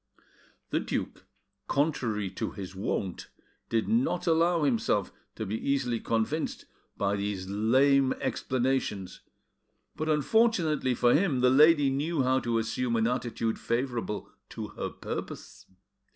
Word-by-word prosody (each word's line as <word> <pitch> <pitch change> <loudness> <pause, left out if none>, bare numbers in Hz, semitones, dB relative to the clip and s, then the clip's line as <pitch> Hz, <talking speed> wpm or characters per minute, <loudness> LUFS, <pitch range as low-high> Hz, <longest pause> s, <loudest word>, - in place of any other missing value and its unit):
The - - +2
duke, - - -4 0.4
contrary 120 - 0
to 95 - -3
his 95 -2 -7
wont, 95 -1 -3 0.4
did 115 -1 0
not 225 -6 +1
allow 170 0 +3
himself 120 -6 +1 0.2
to 110 - -4
be 105 +2 -3
easily 130 -4 0
convinced 115 +9 -2 0.3
by 100 0 +1
these 100 -2 -3
lame 130 +7 +3
explanations, 125 -7 -2 0.7
but 155 0 -3
unfortunately 155 - +2
for 120 +1 +4
him 150 -6 +2
the 125 0 +5
lady 145 0 +6
knew 145 +2 0
how 130 +1 +3
to 120 -2 -1
assume 115 +2 -1
an 115 -1 +2
attitude 115 -2 -1
favourable 120 -3 -2 0.2
to - - -6
her - - -4
purpose. - - -7
125 Hz, 125 wpm, -28 LUFS, 110-150 Hz, 0.7 s, lady